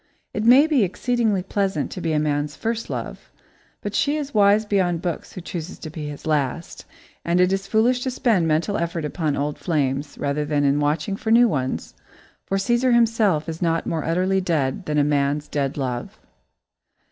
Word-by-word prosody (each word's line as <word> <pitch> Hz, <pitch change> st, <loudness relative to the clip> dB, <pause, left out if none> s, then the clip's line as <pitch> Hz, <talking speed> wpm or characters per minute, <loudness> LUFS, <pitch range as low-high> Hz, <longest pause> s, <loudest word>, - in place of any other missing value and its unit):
It 215 Hz, -, -2 dB
may 255 Hz, +5 st, +7 dB
be 295 Hz, -8 st, +3 dB
exceedingly 220 Hz, 0 st, 0 dB
pleasant 190 Hz, -5 st, -1 dB
to 185 Hz, -, -6 dB
be 165 Hz, -, -1 dB
a 155 Hz, -, +1 dB
man's 145 Hz, -1 st, -1 dB
first 225 Hz, +4 st, -3 dB
love, -, -, -6 dB, 0.5 s
but 205 Hz, -, -4 dB
she 290 Hz, +6 st, +1 dB
is 290 Hz, -2 st, -5 dB
wise 205 Hz, 0 st, +4 dB
beyond 180 Hz, -5 st, 0 dB
books 175 Hz, -2 st, -4 dB
who 185 Hz, -, -7 dB
chooses 170 Hz, 0 st, -6 dB
to 155 Hz, -, -8 dB
be 155 Hz, -1 st, -6 dB
his 145 Hz, -, -9 dB
last, 155 Hz, +1 st, -2 dB, 0.4 s
and 170 Hz, +1 st, +1 dB
it 180 Hz, +1 st, +4 dB
is 195 Hz, 0 st, -2 dB
foolish 240 Hz, +4 st, +2 dB
to 260 Hz, -, -1 dB
spend 230 Hz, -9 st, +1 dB
mental 165 Hz, +7 st, +1 dB
effort 170 Hz, -1 st, -2 dB
upon 150 Hz, -1 st, -2 dB
old 145 Hz, +1 st, -2 dB
flames, 145 Hz, -4 st, -1 dB
rather 145 Hz, +1 st, -1 dB
than 145 Hz, -1 st, 0 dB
in 140 Hz, +1 st, +2 dB
watching 150 Hz, +6 st, 0 dB
for 220 Hz, -, -5 dB
new 235 Hz, +2 st, +6 dB
ones, 130 Hz, -, -2 dB, 0.5 s
for 195 Hz, -, 0 dB
Cæsar 240 Hz, +4 st, +2 dB
himself 220 Hz, -9 st, +2 dB
is 165 Hz, 0 st, -5 dB
not 165 Hz, -1 st, 0 dB
more 160 Hz, -2 st, -2 dB
utterly 185 Hz, +3 st, +1 dB
dead 155 Hz, -7 st, -1 dB
than 150 Hz, 0 st, 0 dB
a 145 Hz, -, +4 dB
man's 145 Hz, 0 st, 0 dB
dead 140 Hz, -1 st, -2 dB
love. 125 Hz, -3 st, -4 dB
170 Hz, 190 wpm, -22 LUFS, 150-210 Hz, 0.5 s, may